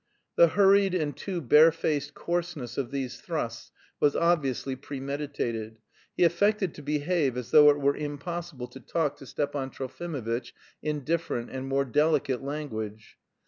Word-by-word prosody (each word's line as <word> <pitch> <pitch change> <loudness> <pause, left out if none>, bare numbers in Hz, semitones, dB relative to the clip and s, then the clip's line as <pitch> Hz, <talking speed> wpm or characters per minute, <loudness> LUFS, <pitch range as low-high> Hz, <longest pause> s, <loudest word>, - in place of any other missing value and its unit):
The - - +7
hurried 195 -1 +4
and 150 -5 -1
too 185 -4 -4
barefaced 155 +1 +4
coarseness 170 -8 -3
of 135 -4 -2
these 130 -3 -4
thrusts 120 -9 -4 0.3
was 145 -1 +3
obviously 140 -6 +1
premeditated. 135 -5 -4 0.4
He - - +4
affected 195 +2 +2
to - - -10
behave 150 -2 0
as 125 -2 -5
though 150 -1 +9
it 145 0 +3
were 140 0 +2
impossible 145 -2 -5
to 135 - -11
talk 150 +1 -1
to 135 - -12
Stepan 140 -1 -2
Trofimovitch 130 -4 -4 0.3
in 150 -2 -2
different 155 -6 -2
and 130 0 -5
more 135 0 +1
delicate 145 -1 +1
language. 110 -7 -6
145 Hz, 140 wpm, -28 LUFS, 130-165 Hz, 0.4 s, though